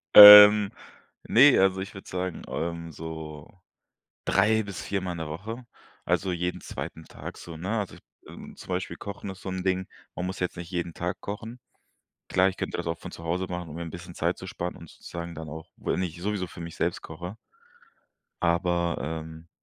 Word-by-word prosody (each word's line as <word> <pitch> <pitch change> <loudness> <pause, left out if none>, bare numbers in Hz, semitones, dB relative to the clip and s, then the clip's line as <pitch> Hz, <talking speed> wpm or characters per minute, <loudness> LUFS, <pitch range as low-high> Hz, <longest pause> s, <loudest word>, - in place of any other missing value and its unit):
Ähm, 105 0 +12 0.5
ne, 130 +3 +6
also, 95 0 +3
ich 95 +2 -6
würde 95 - -11
sagen, 90 -2 -3
ähm, 85 0 -4
so 80 -1 -8 0.8
3 110 +3 +3
bis 100 -2 -6
4 100 -1 -2
Mal 90 -1 -3
in 85 - -6
der 80 -1 -4
Woche. 110 +10 -6 0.4
Also, 95 -1 0
jeden 90 +1 -2
2. 80 - -7
Tag - - -9
so, 85 -2 -9
ne? 100 +7 -2
Also 100 - -4
ich - - -15 0.3
ähm, - - -11
zum - - -12
Beispiel 90 -2 -3
Kochen 100 -1 -7
ist 95 - -10
so - - -6
'n 95 -1 -3
Ding, 95 0 0 0.3
man 90 - -2
muss 95 - -5
jetzt 90 0 -2
nicht 85 0 -8
jeden 85 -1 -2
Tag 90 +2 -3
kochen. 110 +4 -7 0.7
Klar, 95 +1 +4
ich 95 - -8
könnte - - -3
das - - -4
auch 85 - -2
von - - -8
zu 80 - -10
Hause 90 +3 -1
machen, 90 -2 -5
um 75 - -8
mir 85 - -4
'n 85 - -6
bisschen 85 0 -9
Zeit 85 +2 0
zu 95 - -9
sparen 90 0 -4
und 85 - -12
sozusagen 85 -1 -8
dann 80 -1 -7
auch 80 +1 -9
wenn - - -1
ich 85 -1 -5
sowieso 100 -2 -2
für 85 - -10
mich 85 -1 -7
selbst - - -1
koche 90 +6 -8 1.1
aber, 85 0 +1
ähm, 80 +2 -6
90 Hz, 205 wpm, -27 LUFS, 85-95 Hz, 1.1 s, Ähm